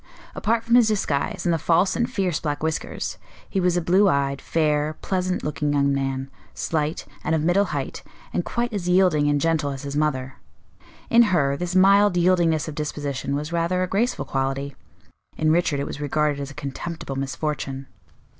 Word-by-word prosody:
Apart 225 +2 0
from 235 - -1
his 240 -2 +6
disguise, 190 -11 -1
and 175 - +3
the 165 - 0
false 175 +4 +2
and 240 +1 0
fierce 190 -8 0
black 145 -1 -3
whiskers, 160 0 -3 0.3
he 195 - -1
was 180 -1 +2
a - - +1
blue 190 +4 +4
eyed, 140 -2 0
fair, 155 -1 0
pleasant 185 -1 -1
looking 150 -1 -1
young 140 -1 +2
man, 135 -1 -2 0.2
slight, 155 -1 -2 0.2
and 160 - +1
of 155 - 0
middle 180 +5 +3
height, 145 -6 -4 0.3
and 175 - 0
quite 240 +4 -2
as 180 -4 -2
yielding 180 -5 +4
and 145 0 +2
gentle 160 -2 +1
as 135 0 -6
his 140 0 -5
mother. 135 -3 -1 0.7
In 235 - +7
her, 140 -7 +2
this 175 +4 -4
mild 195 0 +5
yieldingness 170 -3 +2
of 155 - -5
disposition 145 -2 -3
was 150 +3 -4
rather 170 +2 +1
a - - -1
graceful 215 +7 0
quality; 135 +1 -2 0.6
in 155 0 +2
Richard 160 -3 +2
it 140 - -2
was 150 - -6
regarded 150 0 0
as 140 - -5
a 145 - -12
contemptible 150 +1 -5
misfortune. 135 0 -3
155 Hz, 185 wpm, -23 LUFS, 140-180 Hz, 0.7 s, In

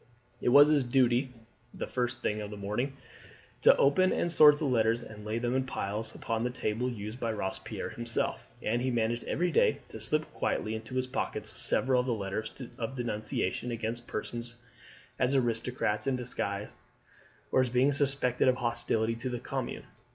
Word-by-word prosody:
It - - +2
was 145 +4 +8
his 150 -3 +4
duty 125 +1 +2 0.4
the - - -3
first 120 -1 -2
thing 105 0 0
of 105 0 -6
a 105 - -6
morning 120 +8 -2 0.6
to - - +7
open 185 +7 +4
and 175 - 0
sort 150 -2 +8
the 150 - -2
letters 115 -2 +2
and 105 -2 -10
lay 110 +1 -2
them 120 +1 0
in 130 - +2
piles 105 0 -3
upon 115 0 -2
the 125 - +1
table 125 0 -1
used 110 +1 -6
by 115 -2 -1
Robespierre 100 -3 -4
himself, 120 -1 -3
and 120 +3 +1
he 130 - 0
managed 120 -1 0
every 175 +1 0
day - - +3
to - - -9
slip - - -1
quietly 110 - -1
into 110 +3 -6
his 130 0 +1
pockets 125 - -3
several 130 -1 +1
of 125 - -1
the 120 - +1
letters 100 +1 -3 0.3
of 120 +3 -3
denunciation 110 -2 -2
against 115 +1 -4
persons 115 +2 -5 0.6
as 130 +2 +2
aristocrats 115 -2 0
in 135 - +2
disguise 105 -5 -3 0.8
or 130 - +5
as 130 - +1
being 125 +4 +3
suspected 135 -3 +1
of 130 - +5
hostility 115 -2 0
to 115 +3 -4
the 120 -1 -3
Commune. 130 0 -4
120 Hz, 180 wpm, -30 LUFS, 110-130 Hz, 0.8 s, was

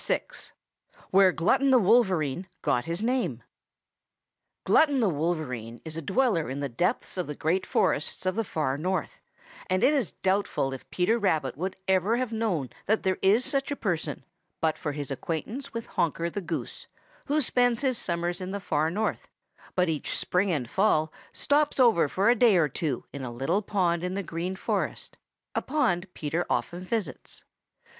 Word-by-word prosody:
_] - - -11
VI - - 0 0.9
WHERE 190 0 +6
GLUTTON 260 +12 +2
THE 260 - +6
WOLVERINE 185 - +3 0.2
GOT 120 - +1
HIS 170 +5 -3
NAME 250 +2 0 1.2
Glutton 290 -4 +4
the 225 - +3
Wolverine 145 -8 -2
is 160 -1 -5
a 165 - -3
dweller 195 - +1
in 135 +2 -4
the 140 - -1
depths 175 - -1
of 180 - -2
the 150 - -5
Great 180 +6 0
Forests 150 - 0
of 185 - +1
the 225 +3 0
Far 145 -8 -2
North, 190 - -2 0.5
and 185 +1 +1
it 290 - +5
is 255 - 0
doubtful 190 -8 0
if 130 - -9
Peter 205 +6 +1
Rabbit 155 - +1
would 185 +6 -3
ever 190 +4 +3
have 250 -2 -2
known 185 - -1 0.2
that 220 +1 +2
there 190 -1 0
is 210 +6 +4
such 275 -1 0
a 285 - -1
person 180 - -3 0.3
but 160 -1 +1
for 150 - -4
his 145 -2 -5
acquaintance 210 - -4
with 230 0 -5
Honker 170 +1 -1
the 205 - -3
Goose, 175 - -5 0.4
who 295 +2 +1
spends 245 -3 +2
his 260 -3 +1
summers 175 -3 -2
in 185 - -4
the 200 +1 -3
Far 160 -5 0
North, 210 +6 -2 0.5
but 180 -1 +3
each 155 -3 -1
spring 185 +2 +1
and 140 -7 -1
fall 155 - +2 0.2
stops 290 0 +1
over 230 - +5
for 195 +7 +1
a 240 - +6
day 225 -4 +5
or 165 -3 +4
two 145 -1 -3
in 140 - -6
a 125 - -4
little 135 - 0
pond 180 -5 0
in 180 +1 -2
the 200 - -2
Green 175 +2 -4
Forest, - - -2 0.4
a - - 0
pond 200 - 0
Peter 160 +3 -1
often 175 - -1
visits. 185 - -4
185 Hz, 180 wpm, -27 LUFS, 160-225 Hz, 1.2 s, WHERE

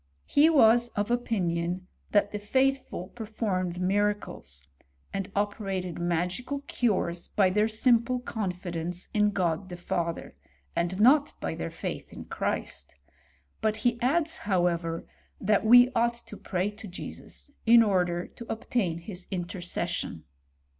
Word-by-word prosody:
He 295 +3 +5
was 240 -6 +6
of 205 +3 -1
opinion 180 -7 -1 0.2
that 205 -1 +3
the 210 - -3
faithful 260 -4 0
performed 205 -6 -2
miracles, 190 - -1 0.5
and 195 0 -3
operated 195 -4 -2
magical 180 +11 -1
cures 195 -11 -1
by 190 -3 +3
their 210 +3 +3
simple 235 +2 +3
confidence 180 -6 -4
in 210 -1 +4
God 185 -2 -1
the 180 - -5
Father^ 175 -1 -3 0.4
and 175 +3 -1
not 280 +6 +5
by - - -2
their 165 +1 -4
faith 165 - -6
in - - -9
Christ; 65 0 -3 0.7
but 215 0 +1
he 240 0 +2
adds, 315 +6 +1
however, 175 -4 0 0.3
that 210 +1 +2
we 245 +3 +8
ought 235 0 +2
to - - -9
pray 185 +1 -2
to 210 +1 -10
Jesus, 185 - -8 0.2
in 230 0 +8
order 180 -4 +1
to 235 - -9
obtain 220 -6 -1
his 180 +1 -8
intercession. 175 - -3
200 Hz, 130 wpm, -28 LUFS, 175-230 Hz, 0.7 s, we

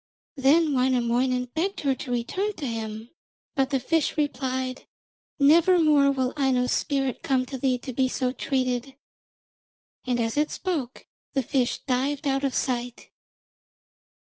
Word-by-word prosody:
Then 295 +3 +4
Wainamoinen 250 -1 +1
begged 370 +5 -1
her 275 -3 +2
to 260 0 -7
return 370 - -1
to 300 - -6
him, 225 -1 -5 0.4
but 270 -1 +1
the 275 -2 +1
fish 320 +3 0
replied: 260 -3 -2 0.5
'Nevermore 305 -1 +5
will 260 -2 0
Aino's 260 -3 +1
spirit 270 -3 -1
come 260 -2 +1
to 265 +1 -6
thee 255 -1 +1
to 255 +1 -7
be 260 +2 +2
so 255 0 -1
treated,' 260 0 -2 1.1
and 245 -1 +1
as 225 +2 -1
it 300 +1 +2
spoke 300 -10 -4 0.3
the 270 -2 +1
fish 250 0 0
dived 275 +3 -1
out 270 0 0
of 275 -2 0
sight. 245 -2 -3
265 Hz, 140 wpm, -25 LUFS, 250-285 Hz, 1.1 s, Nevermore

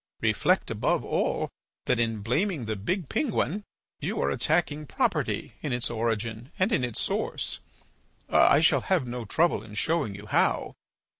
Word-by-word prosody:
Reflect, - - +2
above - - 0
all, - - 0 0.4
that 120 - +2
in 115 -3 0
blaming 150 - 0
the 110 0 -2
big 165 - -2
penguin 210 - 0 0.4
you - - -2
are 70 - +1
attacking 155 - 0
property - - 0
in 150 - -3
its 120 -1 0
origin 115 +1 -2
and 190 +5 +2
in 195 - +2
its 120 -3 -2
source. - - -2 0.7
I 140 - +5
shall 160 - +4
have 180 -8 +1
no 120 -1 -5
trouble 165 -6 +2
in 105 -1 -11
showing 135 -6 0
you 100 +1 -9
how. - - +1
125 Hz, 155 wpm, -27 LUFS, 110-165 Hz, 0.7 s, I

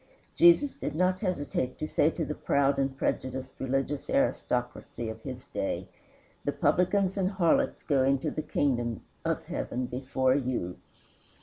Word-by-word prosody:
Jesus 340 -5 +6
did - - -5
not 185 +2 +2
hesitate 145 - -2
to 155 - -3
say 155 - +3
to 165 -1 -3
the 150 - -3
proud 140 -1 +1
and 135 0 -1
prejudiced 130 -1 -3
religious 135 +2 -1
aristocracy 125 - -1
of 110 0 -7
his 130 0 -7
day, 95 -7 -3 0.5
"The - - -1
publicans 190 +2 +2
and 190 -1 +2
harlots 185 -4 +2
go 140 -4 +2
into 135 0 +2
the - - -2
kingdom 120 -7 0 0.2
of - - -1
heaven 125 +1 -3
before 130 +1 0
you." 125 -10 -1
135 Hz, 145 wpm, -29 LUFS, 130-170 Hz, 0.5 s, Jesus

